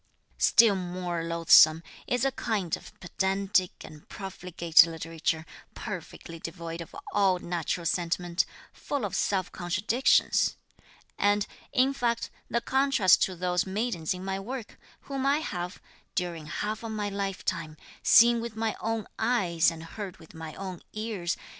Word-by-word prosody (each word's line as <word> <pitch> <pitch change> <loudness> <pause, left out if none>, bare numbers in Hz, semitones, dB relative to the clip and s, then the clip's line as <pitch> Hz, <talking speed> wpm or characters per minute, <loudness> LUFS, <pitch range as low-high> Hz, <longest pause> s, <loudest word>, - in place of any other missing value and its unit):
"Still 225 -3 +6
more 180 -2 -3
loathsome 165 -1 +6 0.2
is 245 +1 +1
a 270 - +2
kind 210 - -1
of - - -14
pedantic 190 +1 0
and 150 -1 -13
profligate 175 -4 +3
literature, 160 0 -3 0.3
perfectly 170 -4 -7
devoid 165 0 -6
of 165 - -10 0.2
all 195 -3 +3
natural 170 -1 -3
sentiment, 175 +1 0 0.3
full 280 -6 -3
of 195 -1 -4
self 195 -1 0
contradictions; 195 +8 +2 0.6
and, 205 0 +3 0.3
in 265 +2 +3
fact, 235 -3 -1 0.2
the 235 - 0
contrast 265 -7 +4
to 185 - +1
those 180 +1 0
maidens 190 -5 -1
in 180 +1 -7
my 195 0 -2
work, 235 +3 -7 0.2
whom 275 -1 -4
I 280 +1 +3
have, 180 - -4 0.4
during 170 -4 -3
half 210 +6 -3
my 215 -2 -3
lifetime, 190 -5 -3 0.2
seen 235 0 +6
with 230 -1 -6
my 220 0 -1
own 225 -2 -2
eyes 175 -10 +2
and 165 -1 -8
heard 190 +2 -7
with 160 -1 -16
my 160 -1 -8
own 185 -3 -6
ears. 210 -4 -3
185 Hz, 140 wpm, -28 LUFS, 170-220 Hz, 0.6 s, Still